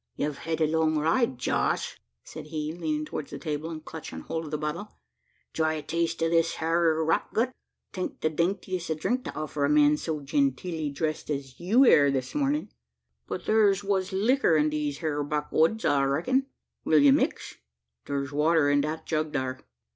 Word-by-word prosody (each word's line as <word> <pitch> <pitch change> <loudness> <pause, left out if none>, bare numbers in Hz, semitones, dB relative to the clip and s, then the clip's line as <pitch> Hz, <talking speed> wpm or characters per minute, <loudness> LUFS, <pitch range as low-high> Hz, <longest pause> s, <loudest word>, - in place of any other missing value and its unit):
"Yev 145 -1 -2
hed 165 -1 -3
a - - +5
long 160 0 +1
ride, 160 - +1
Josh," 125 - -1 0.2
said - - -9
he, 155 0 -3
leaning 155 -3 -2
towards 150 -1 -6
the 140 - -6
table 155 +1 -4
and 155 -1 -7
clutching 160 -1 -8
hold 165 0 -4
of - - -7
the 150 - -2
bottle: 155 +7 -5 0.6
"try 160 -1 +1
a 155 - -5
taste 165 0 -1
o' - - +3
this 165 0 +2
hyur 160 -1 +1
rot 165 - 0
gut 235 +3 +2 0.4
'taint 185 -2 -4
the 155 - +2
daintiest 180 +1 -2
o' 160 - 0
drink 245 +11 -1
to - - -7
offer 155 -1 -3
a 140 - +2
man 150 0 +5
so 155 -1 -3
genteelly 145 +3 -1
dressed 155 +2 -3
as 135 -3 -4
you 220 +10 +4
air 145 - +6
this 130 -2 -2
morning; 290 +1 0 0.6
but - - -4
thur's 205 -2 +3
wuss 195 -2 0
licker 210 -1 +3
in 150 0 +2
these 150 -1 -2
hyur 150 -2 -1
back'oods, 155 +7 +1
I 140 - +3
reckun. 215 - +1 0.4
Will 155 - +3
ye 145 -2 +7
mix? - - 0 0.5
Thur's 140 0 -3
water 150 0 +3
in 145 0 +3
the 155 +2 -3
jug 155 -1 -1
thar." 130 -2 -2
155 Hz, 185 wpm, -27 LUFS, 150-170 Hz, 0.6 s, ye